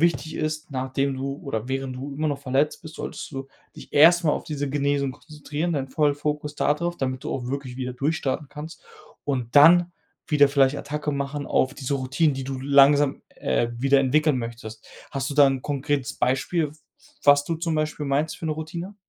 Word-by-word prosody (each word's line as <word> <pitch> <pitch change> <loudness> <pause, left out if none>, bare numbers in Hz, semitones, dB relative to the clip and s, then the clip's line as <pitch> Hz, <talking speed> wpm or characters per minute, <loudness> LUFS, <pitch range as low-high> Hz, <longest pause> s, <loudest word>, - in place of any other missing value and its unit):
wichtig 165 -1 +1
ist, 155 0 -3
nachdem 135 +1 -1
du 135 +1 -3
oder 120 -4 -3
während 135 -1 -3
du 140 +2 -6
immer 155 +2 -1
noch 140 -1 -3
verletzt 140 +2 0
bist, 160 -2 -10
solltest - - -6
du 135 -1 -5 0.3
dich - - -12
erst 170 +4 +6
mal 150 - +3
auf - - -2
diese 145 -2 -3
Genesung 140 -1 0
konzentrieren, 150 +4 -5
deinen 140 -4 -1
vollen 145 +1 +2
Fokus 150 0 -3
da 145 - +2
drauf, 175 +3 -3
damit 130 -3 -3
du - - -3
auch 125 -2 -4
wirklich 135 -2 -5
wieder 125 -1 -4
durchstarten 140 +1 -2
kannst 150 +3 -9 0.4
und 125 -5 -2
dann 175 +4 +7 0.3
wieder 145 -3 +5
vielleicht 140 0 +3
Attacke 150 +1 -3
machen 140 +1 -3
auf 130 +2 +1
diese 140 -1 -3
Routinen, 140 +3 +1
die 135 0 -5
du 135 0 -4
langsam, 140 +1 +4
äh, 120 - 0
wieder 135 +2 +4
entwickeln 145 +1 +2
möchtest. 115 -2 -8 0.2
Hast 135 0 -2
du - - -4
da 145 -1 +7
'n 135 -1 0
konkretes 145 -2 -2
Beispiel, 145 +5 0
w - - -19 0.5
was 145 0 +6
du 165 - -2
zum 165 0 -2
Beispiel 155 -1 -2
meinst 145 +3 0
für 170 - -5
'ne 155 - 0
Routine? 170 +5 -6
145 Hz, 200 wpm, -24 LUFS, 135-150 Hz, 0.5 s, dann